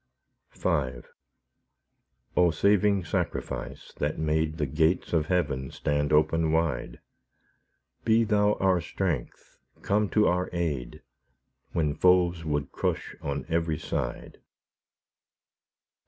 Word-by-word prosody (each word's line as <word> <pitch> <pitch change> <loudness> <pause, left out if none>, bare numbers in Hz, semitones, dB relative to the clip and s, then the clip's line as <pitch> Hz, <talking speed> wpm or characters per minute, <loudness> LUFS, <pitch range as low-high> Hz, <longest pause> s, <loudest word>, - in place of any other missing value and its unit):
V - - -3 1.7
O 90 -1 +5
Saving 100 +2 +2
Sacrifice! - - -4
that 75 +1 -1
made 80 0 0
The 75 - 0
gates 80 +7 +1
of 80 -2 +2
heaven 70 -8 0
stand 75 0 -1
open 80 +1 +3
wide, 80 -6 -1 1.0
Be 115 0 +4
Thou 105 -1 +3
our 95 -2 +2
strength, 85 -6 -4 0.2
come 105 0 +1
to 105 -1 +3
our 90 +1 +1
aid, 75 -10 -3 0.7
When 75 -3 +1
foes 90 0 +3
would 75 -2 -2
crush - - -2
on 70 -1 -3
every 80 -2 0
side. - - -4
80 Hz, 105 wpm, -27 LUFS, 75-90 Hz, 1.7 s, O